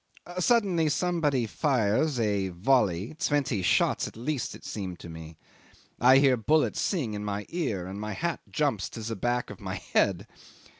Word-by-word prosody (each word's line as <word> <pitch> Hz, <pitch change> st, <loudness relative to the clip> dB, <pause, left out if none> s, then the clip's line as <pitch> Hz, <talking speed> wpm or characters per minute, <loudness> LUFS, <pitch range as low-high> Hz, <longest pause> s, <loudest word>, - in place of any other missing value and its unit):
Suddenly 185 Hz, -6 st, +3 dB
somebody 150 Hz, -6 st, +1 dB
fires 125 Hz, +2 st, +1 dB
a 100 Hz, -4 st, 0 dB
volley 95 Hz, -, +1 dB
twenty 140 Hz, -8 st, 0 dB
shots 90 Hz, -, +2 dB
at -, -, -11 dB
least 130 Hz, +2 st, -3 dB
it -, -, -14 dB
seemed 95 Hz, -4 st, -5 dB
to 85 Hz, -, -10 dB
me. 80 Hz, -1 st, -10 dB, 0.6 s
I 130 Hz, +2 st, +7 dB
hear 135 Hz, -2 st, +5 dB
bullets 150 Hz, +7 st, +2 dB
sing 140 Hz, -, -1 dB
in 105 Hz, 0 st, -4 dB
my 105 Hz, 0 st, -3 dB
ear, 130 Hz, -, -2 dB
and 95 Hz, +3 st, -6 dB
my 105 Hz, 0 st, -4 dB
hat 170 Hz, +9 st, -2 dB
jumps 140 Hz, -10 st, 0 dB
to 115 Hz, -, -8 dB
the 115 Hz, +1 st, -3 dB
back 120 Hz, +4 st, -1 dB
of -, -, -10 dB
my -, -, -4 dB
head. -, -, 0 dB
120 Hz, 165 wpm, -28 LUFS, 100-150 Hz, 0.6 s, I